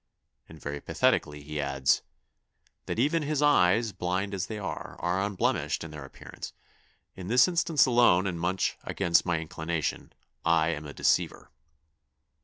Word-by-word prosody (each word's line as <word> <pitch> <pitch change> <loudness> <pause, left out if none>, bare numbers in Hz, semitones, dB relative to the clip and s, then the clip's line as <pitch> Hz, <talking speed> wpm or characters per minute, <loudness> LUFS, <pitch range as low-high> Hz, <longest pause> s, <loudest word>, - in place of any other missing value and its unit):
And 80 - -12
very 70 0 -5
pathetically 75 -1 0
he 75 0 -4
adds, 70 0 +1 0.9
'That - - -3
even 150 +7 +2
his 150 0 -1
eyes, 115 -5 +4
blind 95 +2 -2
as 95 -1 -2
they 110 - -5
are, 100 -2 -6
are 90 +2 0
unblemished 100 -4 -1
in 80 - -8
their 75 -2 -8
appearance; 65 - -10 0.6
in 90 -1 -8
this 125 +4 +5
instance 170 -4 +3
alone, 120 -7 +4
and 90 -3 -2
much 90 +2 -1
against 85 -2 +1
my 85 -1 +2
inclination, 80 0 -3 0.3
I 80 -1 +3
am 75 -2 -4
a 70 - -8
deceiver! - - 0
90 Hz, 150 wpm, -28 LUFS, 80-110 Hz, 0.9 s, this